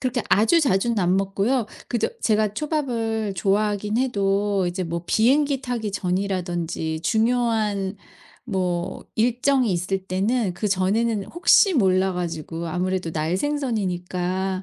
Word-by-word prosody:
그렇게 250 -3 -1
아주 225 - +4
자주는 235 -4 +1
안 180 0 +2
먹고요. 200 +5 0 0.2
그저 235 - 0
제가 215 -2 +2
초밥을 230 -8 -1
좋아하긴 205 +2 0
해도 200 -5 +1
이제 180 +1 -2
뭐 170 +1 -4
비행기 270 +6 +2
타기 235 -5 -3
전이라든지 175 -4 -2
중요한 220 -3 0 0.5
뭐 180 -6 -2
일정이 245 +1 +2
있을 185 +2 -2
때는 195 +2 0
그전에는 205 +3 0
혹시 370 +3 +4
몰라 190 - +2
가지고 170 -1 -4
아무래도 180 0 -2
날생선이니까 185 - -1
200 Hz, 285 characters per minute, -23 LUFS, 185-235 Hz, 0.5 s, 아주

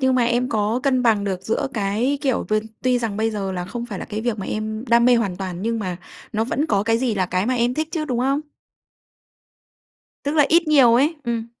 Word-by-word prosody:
nhưng 260 -1 +3
mà 245 -2 +3
em 240 +2 +1
có 220 +3 0
cân 255 -3 +2
bằng 215 -4 +3
được 190 -2 -3
giữa 220 - -1
cái, 220 +7 0
kiểu, 265 -4 0
v 215 - +1 0.3
tuy 250 -1 +2
rằng 220 -4 -3
bây 220 +1 0
giờ 195 -3 -3
là 180 -1 -3
không 235 +6 -6
phải 205 -5 -6
là - - -5
cái 215 +1 -5
việc 230 -2 -2
mà 190 - -4
em 215 +2 -3
đam 235 0 +5
mê 250 0 +6
hoàn 200 -6 -1
toàn, 185 -1 -5
nhưng 230 0 -1
mà 185 -4 -3 0.4
nó 220 +1 0
vẫn 290 +5 -1
có 200 -5 +1
cái 225 +1 +1
gì 245 -3 0
là 185 -3 0
cái 185 +4 -1
mà 255 - +1
em 240 +1 +1
thích 310 0 -2
chứ, 315 -3 -2
đúng 250 -5 -2
không? 275 +3 +1 1.8
Tức 285 - -1
là 295 -2 +5
ít 335 -1 +3
nhiều 260 -6 +6
ấy. 290 +7 +3
Ừm. 230 -1 -2
235 Hz, 250 wpm, -22 LUFS, 210-255 Hz, 1.8 s, mê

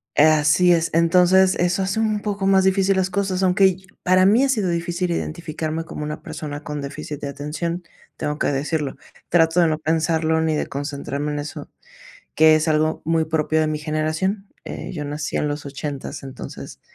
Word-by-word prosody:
Así 155 +3 +5
es, 165 0 +1
entonces 180 +3 +5
eso 180 +2 +1
hace 195 +4 -1
un 215 -2 0
poco 200 -2 -2
más 190 -1 +5
difícil 190 +1 +3
las 190 0 0
cosas, 190 -1 -1
aunque 190 0 +4 0.2
para 185 +1 +4
mí 220 +7 +5
ha 275 - +2
sido 215 -8 +1
difícil 170 +1 -2
identificarme 160 -1 -3
como 165 - -7
una 150 0 -5
persona 150 -1 -6
con 150 -1 -5
déficit 140 +1 -6
de - - -3
atención, 150 +5 -4 0.3
tengo 150 +1 -3
que - - +1
decirlo, 145 0 -1 0.3
trato 165 0 +3
de 170 - +5
no 155 -1 0
pensarlo 160 0 +1
ni 160 -1 +1
de - - -1
concentrarme 145 +1 -4
en 145 - -2
eso, 145 +1 -7 0.7
que 155 0 +6
es 155 +1 0
algo 155 0 +1
muy 160 0 +1
propio 160 0 0
de 155 - +3
mi 155 0 -2
generación. 155 +6 -2 0.2
Eh, - - -6
yo 150 -4 -4
nací 145 0 -3
en 150 - 0
los 145 0 -4
ochentas, 140 0 -6
entonces 135 -1 -9
160 Hz, 185 wpm, -22 LUFS, 150-185 Hz, 0.7 s, que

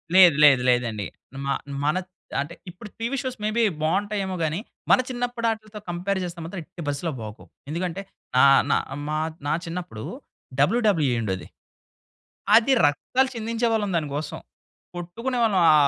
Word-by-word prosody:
లేదు 180 -5 +9
లేదు. 135 -4 +7
లేదండి. 115 -5 +1 0.4
మా 140 - +1 0.3
మనత్ 185 +5 0 0.3
అంటే 145 +5 -3 0.2
ఇప్పుడు 180 +4 -10
టీవీ 235 +4 -1
షోస్ 255 -2 -4
మే 210 - +1
బి 235 - +4 0.2
బాగుంటాయేమో 195 +3 0
గాని, 160 +3 0 0.3
మన - - +7
చిన్నప్పటి 245 -1 -2
వాటితో 215 -1 -5
కంపేర్ 185 +3 -1
చేస్తే, 175 -1 -6
మాత్రం 180 +3 -6
ఎట్టి 175 +2 -11
పరిస్థితిలో 145 +4 -1
బాగోవు. 110 -1 -9 0.2
ఎందుకంటే 175 +3 -2 0.4
నా - - +7 0.3
నా - - +5 0.3
మా 155 0 -1 0.3
నా 145 - +2
చిన్నప్పుడు 165 -10 -6 0.6
డబల్యుడబల్యుఈ 165 - +3
ఉండేది. 95 -4 -3 1.1
అది 240 +4 +5
రక్తాలు 255 - +1
చిందించేవాళ్ళం 225 -2 0
దానికోసం. 150 -1 -3 0.6
కొట్టుకునేవాళ్ళం 220 +4 0
ఆ - - +6
180 Hz, 135 wpm, -25 LUFS, 150-220 Hz, 1.1 s, లేదు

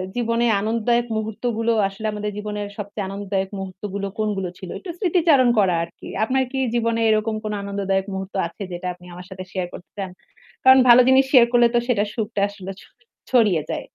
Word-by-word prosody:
জীবনে 235 0 +1 0.2
আনন্দদায়ক 230 +2 +1
মুহূর্তগুলো 225 +1 -1 0.2
আসলে 195 +3 -8
আমাদের 210 0 -3
জীবনের 210 0 -4
সবচেয়ে 205 -1 -5
আনন্দদায়ক 195 -1 -3
মুহূর্তগুলো 195 +1 -5
কোনগুলো 205 -4 -1
ছিল। 185 - -9
একটু 370 - -10
স্মৃতিচারণ 325 - +4
করা 190 -3 +3
আরকি। 170 +1 -11 0.2
আপনার 260 +4 +1
কি 270 - -4 0.2
জীবনে 230 -1 +1
এরকম 215 0 +1
কোন 215 -1 -3
আনন্দদায়ক 195 -1 -1
মুহূর্ত 190 0 -5
আছে? 170 - -15
যেটা 175 +1 -5
আপনি 180 0 -18
আমার 180 +1 -10
সাথে 185 0 -7
শেয়ার 185 -2 -2
করতে 175 - -11
চান? 195 -2 -3 0.5
কারণ 260 0 +8
ভালো 240 +1 +9
জিনিস 265 +1 +5
শেয়ার 250 -4 +8
করলে 240 -1 +5
তো - - +5
সেটার 210 -4 +1
সুখটা 210 -2 -3
আসলে 195 -2 -8
ছ - - -15 0.5
ছড়িয়ে 215 -10 +4
যায়। - - -3
210 Hz, 180 wpm, -22 LUFS, 195-235 Hz, 0.5 s, ভালো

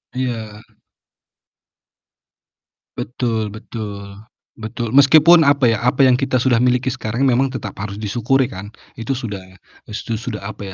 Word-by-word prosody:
Iya. 115 -5 -4 2.4
Betul 110 -3 -3
betul. 100 -3 -8 0.4
Betul, 115 +1 -5
meskipun, 155 +6 +6
apa 140 -3 +4
ya, 115 - +1
apa 125 +2 +2
yang 130 -2 +5
kita 130 -2 0
sudah 125 -2 +3
miliki 125 +2 +1
sekarang 120 -1 -4
memang 130 +2 +1
tetap 105 -6 -6
harus 100 0 -5
disyukuri 120 +5 0
kan, 100 +3 -9 0.2
itu 115 +3 -3
sudah 115 -6 -5 0.6
su 110 +1 -4
sudah 110 -3 -6
apa 100 -2 -8
120 Hz, 130 wpm, -19 LUFS, 105-130 Hz, 2.4 s, meskipun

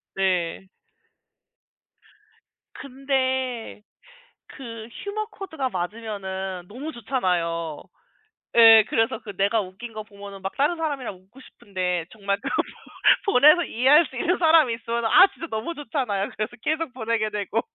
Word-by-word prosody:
네. 185 -1 -1 2.1
근데 260 -4 -2 0.7
그 230 -4 -9 0.2
유머 430 +1 -3
코드가 320 -10 -4
맞으면은 190 -2 -5
너무 275 +9 -7
좋잖아요. 170 - -2 0.7
예. 225 -2 +9
그래서 225 0 0
그 205 -4 -10
내가 200 +3 +2
웃긴 205 +5 -8
거 215 0 -6
보면은 200 -2 -11
막 190 - -4
다른 295 +5 +2
사람이랑 285 -9 -3
웃고 195 +9 -19
싶은데 180 -7 -4
정말 200 -2 -2
그거 - - 0 0.6
보 405 - 0
보내서 305 +7 +7
이해할 280 +8 +4
수 260 - -12
있는 355 +8 0
사람이 315 -8 +5
있으면은 235 -1 -2
아 375 - +8
진짜 335 - -7
너무 220 +10 -3
좋잖아요. 225 -8 -2
그래서 215 +3 -4
계속 310 -2 -1
보내게 220 -3 -1
되고. 210 +2 -2
225 Hz, 285 characters per minute, -24 LUFS, 195-270 Hz, 2.1 s, 예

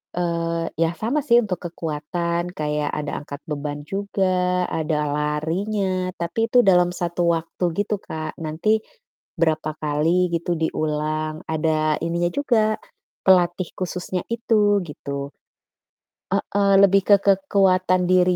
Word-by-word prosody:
eee, 170 -1 -1
ya 165 +1 +1
sama 230 - -1
sih 240 -5 +4
untuk 185 -5 -3
kekuatan, 170 +2 -3
kayak 150 -1 -2
ada 150 -1 -3
angkat 145 0 -9
beban 145 -2 -5
juga, 185 0 0
ada 155 -1 0
larinya, 180 +6 -1
tapi 170 +7 -1
itu 245 +1 +5
dalam 180 -2 +4
1 170 0 -1
waktu 165 +2 -2 0.3
Kak, 155 -3 -6
nanti 165 +8 0 0.6
berapa 155 -2 0
kali 165 +4 +1
gitu 170 +1 -1
diulang, 155 -1 -2
ada 155 -1 +1
ininya 170 +1 0
juga, 220 -6 +1 0.5
pelatih 180 -1 +3
khususnya 180 0 -3
itu 215 -3 +2
gitu. 140 -2 -5 1.1
Heeh, 200 0 +1
lebih 195 0 +5
ke - - +3
kekuatan 185 -2 +3
diri 180 0 +4
175 Hz, 120 wpm, -22 LUFS, 155-190 Hz, 1.1 s, itu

